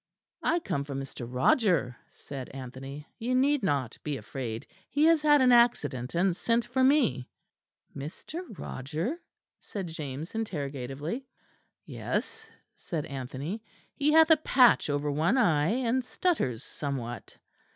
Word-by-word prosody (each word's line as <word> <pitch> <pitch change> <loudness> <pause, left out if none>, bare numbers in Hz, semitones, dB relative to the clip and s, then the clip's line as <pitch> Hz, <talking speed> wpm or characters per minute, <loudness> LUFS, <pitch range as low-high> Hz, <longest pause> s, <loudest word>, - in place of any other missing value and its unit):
"I 335 - +2
come 140 - -2
from 140 -1 -5
Mr. 135 -3 -7
Roger," 130 - +3 0.2
said 135 -3 -8
Anthony, 135 +2 -8
"you 245 +2 0
need 280 +3 +3
not 140 - -1
be 145 -2 -3
afraid. 115 0 -5 0.2
He 290 +2 +3
has 325 -1 +5
had 295 -2 +5
an 250 - +6
accident 150 - +3
and 180 +1 +2
sent 230 +4 +1
for 260 - +1
me." 260 - +3 0.7
"Mr. 155 - -6 0.2
Roger?" 160 - -4 0.4
said 200 -3 -6
James 155 -2 -6
interrogatively. 150 - -4 0.6
"Yes," - - -4 0.3
said 160 -5 -4
Anthony, 140 - -5 0.3
"he 290 +1 +2
hath 320 +1 +6
a 320 - +8
patch 255 - +4
over 145 0 0
one 160 - +2
eye; 160 - +3
and 250 +2 +1
stutters 245 - 0
somewhat." 130 -5 -5
160 Hz, 130 wpm, -29 LUFS, -, 0.7 s, a